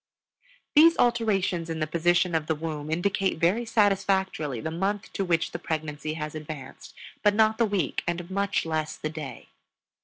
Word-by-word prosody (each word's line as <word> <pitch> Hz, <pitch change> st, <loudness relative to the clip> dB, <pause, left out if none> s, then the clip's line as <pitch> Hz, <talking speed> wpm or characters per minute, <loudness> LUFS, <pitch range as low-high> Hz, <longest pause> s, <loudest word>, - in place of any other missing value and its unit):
These 330 Hz, +3 st, +7 dB
alterations 200 Hz, -8 st, +1 dB
in 160 Hz, -1 st, -3 dB
the 155 Hz, -, +1 dB
position 175 Hz, +2 st, +2 dB
of 160 Hz, -1 st, 0 dB
the 160 Hz, -, +1 dB
womb 155 Hz, -1 st, -5 dB
indicate 190 Hz, +3 st, 0 dB
very 185 Hz, +9 st, +2 dB
satisfactorily 190 Hz, -, +1 dB
the 160 Hz, -, -4 dB
month 195 Hz, +5 st, -2 dB
to 195 Hz, -, -1 dB
which 170 Hz, -3 st, +1 dB
pregnancy 155 Hz, -1 st, -3 dB
has 150 Hz, -1 st, -5 dB
advanced, 150 Hz, -4 st, -8 dB, 0.3 s
but 205 Hz, -1 st, +3 dB
not 220 Hz, +1 st, +3 dB
the 230 Hz, -, +5 dB
week 200 Hz, -4 st, -1 dB
and 175 Hz, 0 st, -2 dB
much 200 Hz, -1 st, 0 dB
less 155 Hz, -1 st, -2 dB
the 155 Hz, -, -4 dB
day. 155 Hz, -4 st, -8 dB
170 Hz, 160 wpm, -27 LUFS, 155-200 Hz, 0.3 s, These